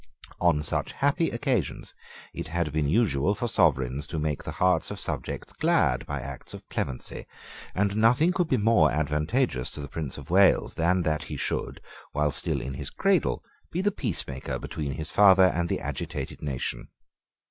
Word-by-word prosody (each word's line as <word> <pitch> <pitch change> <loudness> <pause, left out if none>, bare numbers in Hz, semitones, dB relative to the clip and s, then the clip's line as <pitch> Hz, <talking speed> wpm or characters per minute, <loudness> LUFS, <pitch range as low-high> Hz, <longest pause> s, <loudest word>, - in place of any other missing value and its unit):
On 85 -4 +3
such - - 0
happy 145 +4 +1
occasions 120 - -2 0.4
it - - -5
had 85 -1 -1
been 75 -2 +1
usual 95 - +2
for 120 - -2
sovereigns 70 - +1
to 80 - -4
make 75 -2 -1
the - - -5
hearts 90 0 +2
of - - -6
subjects - - -4
glad - - +2
by - - -3
acts 70 -2 -8
of - - -12
clemency; 65 -2 -4 0.5
and 100 +1 +1
nothing 120 +10 +4
could 175 -2 +1
be 130 - +3
more 105 -7 +4
advantageous 75 - 0
to - - -9
the 70 - -5
Prince 75 -1 -4
of 70 +2 -9
Wales 95 +1 +4
than 90 +2 +2
that 75 -1 -1
he 75 - -6
should, - - -3 0.3
while 75 0 +1
still - - -2
in 65 - -5
his 70 +1 -5
cradle, 195 -2 +1 0.3
be 170 - -2
the 205 +2 +2
peacemaker 75 - -3
between 75 -3 -4
his 80 +3 -5
father 95 -2 +7
and 85 0 -1
the - - 0
agitated 70 -1 -5
nation. 70 -4 -3
80 Hz, 175 wpm, -27 LUFS, 75-110 Hz, 0.5 s, father